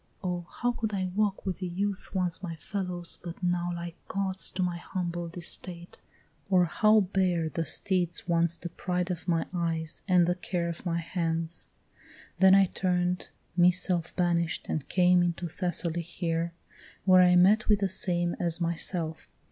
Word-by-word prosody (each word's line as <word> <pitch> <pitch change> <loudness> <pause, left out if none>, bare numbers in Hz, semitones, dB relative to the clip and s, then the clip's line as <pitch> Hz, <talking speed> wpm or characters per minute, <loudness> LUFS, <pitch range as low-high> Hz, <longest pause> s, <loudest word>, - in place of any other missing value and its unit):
Oh, 175 -2 -3
how 245 0 -1
Could 220 -3 -3
I 185 -1 -2
walk 205 -2 0
with 185 -3 -3
the 185 - -3
youth 195 +2 -3
once 180 -1 0
my 170 -3 -5
fellows, 180 0 -1
but 175 +1 -8
now 175 0 0
Like 170 0 -6
Gods 195 -1 -1
to 185 - 0
my 175 -1 -1
humbled 175 -1 -4
estate? 175 0 -3 0.5
or 180 -2 +5
how 215 +5 +4
bear 180 -4 0
The 165 +1 -2
steeds 180 -1 -1
once 170 -1 +2
the 175 - -6
pride 180 +1 -2
of 175 0 -6
my 165 -2 +1
eyes 165 -2 -2
and 180 -2 +5
the 175 - +2
care 175 -1 -3
Of 170 +2 -6
my 170 -1 0
hands? 165 -1 -2 0.7
Then 190 0 +7
I 195 0 +6
turn'd 180 -1 -1 0.3
me 175 0 +6
self 180 -2 0
banish'd, 170 -2 0
and 155 - -3
came 180 -1 +4
Into 175 0 -1
Thessaly 175 0 0
here, 170 0 -2 0.5
where 185 -1 +7
I 180 0 +6
met 200 +5 +5
with 205 -1 +4
the 195 - +2
same 175 -2 0
As 170 -1 0
myself. 165 -1 -2
175 Hz, 170 wpm, -28 LUFS, 170-185 Hz, 0.7 s, Then